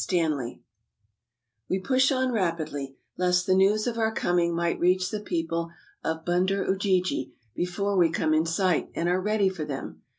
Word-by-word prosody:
STANLEY 155 -9 -1 1.1
TE 185 - +1
push 260 +7 +2
on 260 -1 +1
rapidly, 155 - -2 0.2
lest 180 0 +2
the 185 - +3
news 200 +3 +3
of 235 -2 -2
our 220 0 +2
coming 175 -4 +1
might 170 0 0
reach 185 +1 +2
the 215 - -2
people 165 -3 -2 0.3
of 160 0 -3
Bunder 185 +3 +1
Ujiji 190 -6 0 0.2
before 195 +5 -1
we 175 -3 +4
come 160 -1 0
in 160 +1 +2
sight, 180 +1 +1
and 170 - -1
are 180 +1 +1
ready 210 0 +2
for 185 -4 -3
them. 140 -3 -6
180 Hz, 165 wpm, -26 LUFS, 165-195 Hz, 1.1 s, we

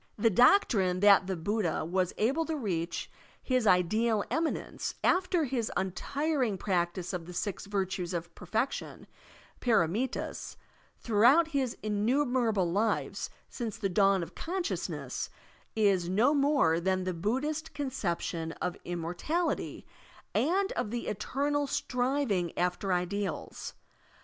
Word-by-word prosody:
The 225 +2 +3
doctrine 200 - +4
that 200 -2 +6
the 190 -2 -2
Buddha 175 -2 -1
was 180 +1 0
able 270 +10 +2
to 320 - -2
reach 180 - -3 0.3
his 255 -4 +1
ideal 210 +4 +3
eminence 325 0 -2
after 365 -2 +3
his 245 -5 -1
tmtiring 255 - -1
practice 180 -1 -1
of 170 -2 -4
the 180 - -8
six 195 +2 -3
virtues 190 -3 -2
of 170 -1 -4
perfection 220 +9 -3 0.6
(pdramitdsY 225 +2 0 0.4
throughout 245 +9 +4
his 270 -5 -1
innumerable 220 -3 +1
lives 210 +5 0 0.2
since 230 -4 -5
the 195 - -1
dawn 195 0 +3
of - - -9
consciousness, 360 +1 -3 0.5
is 195 -5 +2
no 225 +10 +4
more 275 - +3
than 185 +1 0
the 185 0 -2
Buddhist 290 - -2
conception 175 - -2
of 180 -1 -3
immortality 175 - -2 0.5
and 380 +7 +2
of - - -2
the 240 +2 -3
eternal 285 +7 -1
striving 250 - 0
after 180 +2 0
ideals. 180 +1 -2
210 Hz, 120 wpm, -30 LUFS, 180-270 Hz, 0.6 s, that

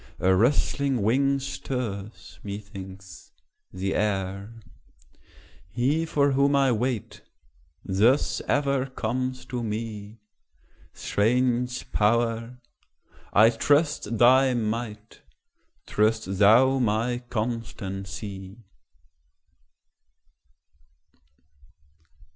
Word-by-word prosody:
a 95 +1 +3
rustling 130 +3 +1
wing 135 +5 +2
stirs, 115 -6 -6
methinks, 95 -2 -9 0.4
the 95 +1 -3
air: 100 +1 -2 1.1
He 135 - 0
for 140 -2 +2
whom 140 +1 +3
I 135 -2 +3
wait, 120 0 -2 0.6
thus 110 +9 +2
ever 140 -2 +1
comes 130 +1 -3
to 125 -1 -4
me; 110 -1 -5 0.7
Strange 125 +3 0
Power! 115 +2 0 0.7
I 110 +3 +6
trust 145 -2 +1
thy 130 +3 +5
might; 110 -1 -4 0.6
trust 105 -3 0
thou 125 +6 +5
my 120 +1 0
constancy. 100 -3 -5
115 Hz, 70 wpm, -25 LUFS, 105-130 Hz, 1.1 s, I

